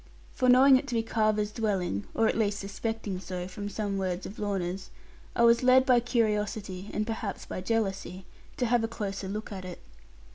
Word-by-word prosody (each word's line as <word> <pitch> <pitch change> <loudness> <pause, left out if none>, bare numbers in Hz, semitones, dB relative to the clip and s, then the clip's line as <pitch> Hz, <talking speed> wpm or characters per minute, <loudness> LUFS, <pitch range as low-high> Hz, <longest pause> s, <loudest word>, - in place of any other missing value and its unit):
For 255 -1 +2
knowing 260 +2 +8
it 280 +2 -4
to 245 - -3
be 225 - +1
Carver's 215 -2 +1
dwelling 195 - -1
(or 225 - +3
at - - +1
least 210 -2 +1
suspecting 200 0 -4
so, 180 -1 -5
from 205 +2 -6
some 205 -2 -2
words 185 -1 -2
of 205 - -8
Lorna's), 190 -2 -2 0.5
I 235 - +3
was 235 0 +6
led 255 +1 +6
by 250 -2 +5
curiosity, 210 -5 -1
and 215 - -1
perhaps 220 -3 -4
by - - -5
jealousy, 195 -3 -2 0.3
to 250 - +1
have 240 0 +2
a - - +1
closer 200 -4 -4
look 210 +3 -5
at 190 -2 -6
it. 180 -1 -8
210 Hz, 190 wpm, -29 LUFS, 195-230 Hz, 0.5 s, knowing